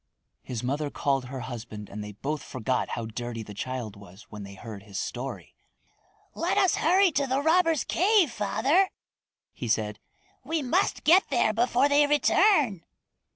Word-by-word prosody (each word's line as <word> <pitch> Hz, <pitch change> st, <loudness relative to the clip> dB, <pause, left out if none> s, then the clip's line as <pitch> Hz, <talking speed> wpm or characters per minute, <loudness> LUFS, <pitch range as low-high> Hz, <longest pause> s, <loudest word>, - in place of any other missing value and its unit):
His 120 Hz, -2 st, -6 dB
mother 145 Hz, +4 st, -1 dB
called 135 Hz, -2 st, -1 dB
her 130 Hz, +1 st, -6 dB
husband 115 Hz, -4 st, -7 dB
and 105 Hz, +1 st, -7 dB
they 105 Hz, 0 st, -8 dB
both 145 Hz, +8 st, -4 dB
forgot 130 Hz, 0 st, -2 dB
how 115 Hz, -, -3 dB
dirty 115 Hz, 0 st, -5 dB
the 105 Hz, -, -10 dB
child 120 Hz, -1 st, -5 dB
was 100 Hz, +1 st, -14 dB
when 105 Hz, -1 st, -8 dB
they 100 Hz, 0 st, -9 dB
heard 110 Hz, -1 st, -9 dB
his 100 Hz, -1 st, -9 dB
story. 130 Hz, +2 st, -5 dB, 0.8 s
"Let -, -, -1 dB
us 375 Hz, -, +3 dB
hurry 365 Hz, +3 st, +4 dB
to 280 Hz, -2 st, 0 dB
the 265 Hz, +1 st, +1 dB
robbers' 325 Hz, -1 st, +3 dB
cave, 375 Hz, -, +3 dB
father," 270 Hz, -, +2 dB, 0.6 s
he 120 Hz, -, -6 dB
said. 105 Hz, -2 st, -1 dB, 0.4 s
"We 310 Hz, +3 st, -2 dB
must 340 Hz, +10 st, 0 dB
get 360 Hz, +5 st, +5 dB
there 235 Hz, -5 st, +2 dB
before 245 Hz, +4 st, +2 dB
they 290 Hz, 0 st, +4 dB
return." 295 Hz, -, +3 dB
145 Hz, 160 wpm, -27 LUFS, -, 0.8 s, get